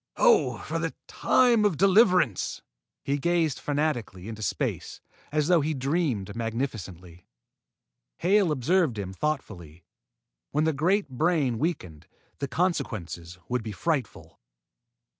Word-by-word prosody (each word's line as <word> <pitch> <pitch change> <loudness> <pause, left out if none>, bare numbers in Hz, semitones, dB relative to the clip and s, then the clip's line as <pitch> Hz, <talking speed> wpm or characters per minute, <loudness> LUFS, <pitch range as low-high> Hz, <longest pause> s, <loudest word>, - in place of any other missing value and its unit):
Oh, 475 -3 +4
for - - -4
the - - -3
time 240 -4 +3
of 200 -7 +2
deliverance!" 185 - +3 0.4
He 140 +1 -1
gazed 170 -2 +1
fanatically 140 - -2
into 110 -1 -7
space, 105 - -3 0.3
as 150 0 +1
though 175 -2 +4
he 155 +2 -1
dreamed 135 - -1
magnificently. 110 -8 -5 0.9
Hale 190 -1 +3
observed 150 - +1
him 95 -2 -5
thoughtfully. 95 - -4 0.7
When 150 +2 0
that 160 0 +2
great 185 +8 +1
brain 140 -3 0
weakened, 90 - -3 0.3
the 140 - -2
consequences 110 - -2
would 125 -1 -1
be 110 -1 -6
frightful. 140 - -3
140 Hz, 120 wpm, -27 LUFS, 110-170 Hz, 0.9 s, Oh